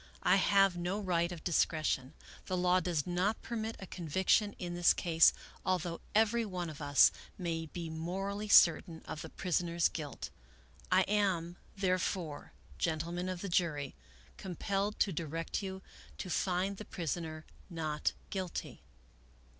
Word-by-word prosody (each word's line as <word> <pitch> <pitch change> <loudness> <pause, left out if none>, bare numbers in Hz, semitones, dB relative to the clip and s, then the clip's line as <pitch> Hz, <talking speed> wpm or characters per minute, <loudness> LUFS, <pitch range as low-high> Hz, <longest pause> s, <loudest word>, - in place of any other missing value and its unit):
I - - +5
have 195 -2 +4
no 175 +4 -2
right 175 -3 0
of 170 -3 -7
discretion. 155 -5 +1 0.3
The 185 - -1
law 180 +1 +4
does 170 -4 -1
not 180 +5 0
permit 225 -1 -3
a 195 - -8
conviction 190 +5 +1
in 175 -1 -5
this 175 0 +4
case, 165 -2 +5 0.3
although 175 -2 -1
every 225 +2 +4
one 180 -5 -4
of 155 - -11
us 145 -1 +6 0.3
may 165 -3 -2
be 170 +1 -6
morally 190 +6 -3
certain 170 -3 +5
of 155 - -6
the 160 - -7
prisoner's 170 -1 +1
guilt. 150 -4 -6 0.6
I 185 +1 +6
am, 190 -4 +1 0.2
therefore, 185 -4 -1 0.3
gentlemen 170 +3 -1
of 185 -2 -4
the 200 - -3
jury, 155 -6 0 0.4
compelled 195 +3 -2
to 195 - +3
direct 165 +3 -3
you 190 -1 -6 0.3
to 185 - -5
find 190 +2 0
the 215 - -7
prisoner 160 -1 -4 0.2
not 155 -3 -1 0.2
guilty." 185 -3 -4
175 Hz, 140 wpm, -33 LUFS, 165-190 Hz, 0.6 s, us